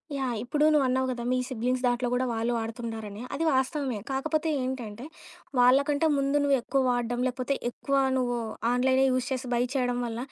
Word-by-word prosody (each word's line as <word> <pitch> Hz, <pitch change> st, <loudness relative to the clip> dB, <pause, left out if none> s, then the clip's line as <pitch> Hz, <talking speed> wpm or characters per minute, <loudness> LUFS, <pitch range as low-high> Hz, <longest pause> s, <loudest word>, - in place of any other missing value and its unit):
Yeah! 265 Hz, -3 st, -1 dB
ఇప్పుడు 295 Hz, +5 st, +1 dB
నువ్వు 290 Hz, -3 st, +4 dB
అన్నావు 260 Hz, +1 st, +1 dB
గదా! 245 Hz, -2 st, -3 dB
మీ 255 Hz, -, +2 dB
సిబ్లింగ్స్ 250 Hz, +1 st, -1 dB
దాంట్లో 245 Hz, 0 st, +1 dB
గూడా 250 Hz, +1 st, +1 dB
వాళ్ళు 230 Hz, +1 st, -1 dB
వాడుతుండారని 225 Hz, -2 st, -5 dB
అది 290 Hz, +4 st, -1 dB
వాస్తవమే. 260 Hz, -3 st, 0 dB
కాకపోతే 310 Hz, +4 st, -1 dB
ఏంటంటే, 250 Hz, -3 st, -5 dB, 0.5 s
వాళ్ళకంటే 280 Hz, +5 st, +4 dB
ముందు 275 Hz, +1 st, +1 dB
నువ్వెక్కువ 275 Hz, -1 st, +1 dB
వాడ్డం 245 Hz, 0 st, -1 dB
లేకపోతే 255 Hz, +2 st, -2 dB, 0.2 s
ఎక్కువ 275 Hz, +3 st, -3 dB, 0.2 s
నువ్వు 245 Hz, -1 st, 0 dB, 0.3 s
ఆన్‌లైనే 260 Hz, +2 st, +3 dB
యూజ్ 255 Hz, 0 st, 0 dB
చేసి 260 Hz, 0 st, -2 dB
బై 240 Hz, -, +2 dB
చేయడం 250 Hz, -3 st, 0 dB
వల్ల 230 Hz, -1 st, -4 dB
255 Hz, 165 wpm, -27 LUFS, 240-270 Hz, 0.5 s, నువ్వు